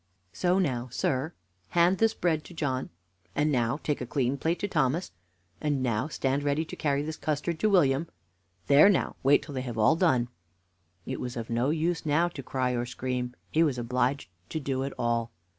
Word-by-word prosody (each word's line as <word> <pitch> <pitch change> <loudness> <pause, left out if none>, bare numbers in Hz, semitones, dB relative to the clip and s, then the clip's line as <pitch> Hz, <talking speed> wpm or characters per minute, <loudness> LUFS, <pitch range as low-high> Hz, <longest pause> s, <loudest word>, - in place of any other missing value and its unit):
"So 180 0 +2
now, 130 -9 0
sir, 130 +5 -1 0.4
hand 175 +2 +3
this 225 -1 +3
bread 160 -3 0
to 175 - -12
John, 130 -5 -2 0.5
and 150 +1 +2
now 120 0 +1
take 150 -2 -2
a 125 - -4
clean 130 0 0
plate 165 +5 0
to 205 - 0
Thomas, 160 0 0 0.5
and 145 -3 0
now 120 +2 0
stand 140 -2 -1
ready 145 +2 0
to - - -8
carry 145 -1 0
this 155 +1 -5
custard 155 +2 -2
to 215 - +3
William. 160 -5 +3 0.6
There 145 - +7
now, 195 - +1
wait 140 +2 +4
till 145 - -9
they 130 - -2
have 120 -3 -5
all 110 +9 +5
done." 130 -9 +2 0.8
It - - -4
was 125 -1 -5
of 115 0 -5
no 120 +4 +1
use 165 +2 0
now 160 +3 +2
to 150 - -8
cry 130 -1 -1
or 120 0 -1
scream; 125 0 -3 0.2
he 160 - +3
was 145 -6 +2
obliged 125 -2 -1 0.2
to 160 - -2
do 135 -2 -2
it 135 0 -3
all. 115 -1 0
140 Hz, 195 wpm, -28 LUFS, 125-160 Hz, 0.8 s, There